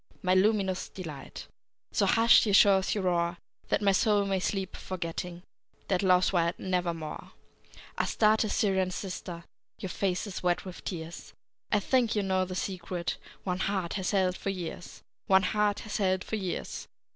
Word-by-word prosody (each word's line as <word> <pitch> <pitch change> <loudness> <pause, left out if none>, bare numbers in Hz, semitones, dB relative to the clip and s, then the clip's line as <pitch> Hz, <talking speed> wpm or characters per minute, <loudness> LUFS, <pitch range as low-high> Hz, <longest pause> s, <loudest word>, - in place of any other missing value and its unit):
My 185 0 +3
luminous 190 -1 +2
delight! 155 -7 -8 0.5
So - - +2
hush, 230 0 +6
ye 205 - +1
shores, 195 -1 +5
your 205 - -1
roar, 175 -1 +1 0.3
That - - +1
my 200 - +5
soul 205 +1 +3
may 195 -1 0
sleep, 190 0 -2
forgetting 175 -1 -5 0.5
Dead 185 -2 +2
Love's 185 -1 +4
wild 170 -1 +1
Nevermore! 175 -4 -3 0.7
Astarte, 215 0 +3
Syrian 190 -4 +1
sister, 180 -2 -6 0.3
Your 190 - -5
face 185 0 -1
is 200 -3 -6
wet 175 +1 0
with 185 -2 -9
tears; 165 -2 -6 0.4
I 210 - +4
think 240 +1 +2
you 205 - +1
know 190 -1 +1
the 185 0 -6
secret 180 -2 -3 0.3
One 180 -1 -2
heart 190 -4 -1
hath 190 -3 -1
held 185 -2 +2
for - - -3
years! 175 -2 -6 0.2
One 190 0 +5
heart 210 +1 +1
hath 215 - -4
held 190 -2 +1
for - - -3
years! 190 -4 -4
185 Hz, 160 wpm, -29 LUFS, 180-200 Hz, 0.7 s, hush